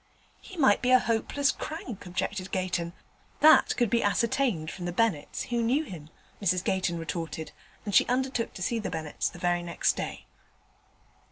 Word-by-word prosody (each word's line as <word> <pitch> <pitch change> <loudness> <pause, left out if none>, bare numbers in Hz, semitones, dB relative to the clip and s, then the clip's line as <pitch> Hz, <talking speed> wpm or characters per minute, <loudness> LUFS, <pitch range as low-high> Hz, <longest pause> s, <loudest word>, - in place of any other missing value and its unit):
'He 375 - -12
might 265 -10 +4
be 250 - +1
a 255 - +8
hopeless 245 +4 +1
crank,' 250 - -7
objected 190 +1 -3
Gayton. 180 -2 -2 0.5
'That 310 +1 +6
could 240 -4 +1
be 235 - +3
ascertained 205 - +1
from 180 - -7
the 175 - -2
Bennetts, 190 -6 0
who 240 -1 +1
knew 255 +7 +2
him,' 160 - -9 0.3
Mrs 185 -2 +1
Gayton 180 -2 0
retorted; 165 -1 -5 0.3
and 205 - -3
she - - +5
undertook 255 -1 -1
to 185 - -5
see 230 +5 0
the 220 - -3
Bennetts 160 -3 -3
the - - -12
very 175 0 +1
next 170 -1 0
day. - - -5
195 Hz, 170 wpm, -28 LUFS, 175-240 Hz, 0.5 s, a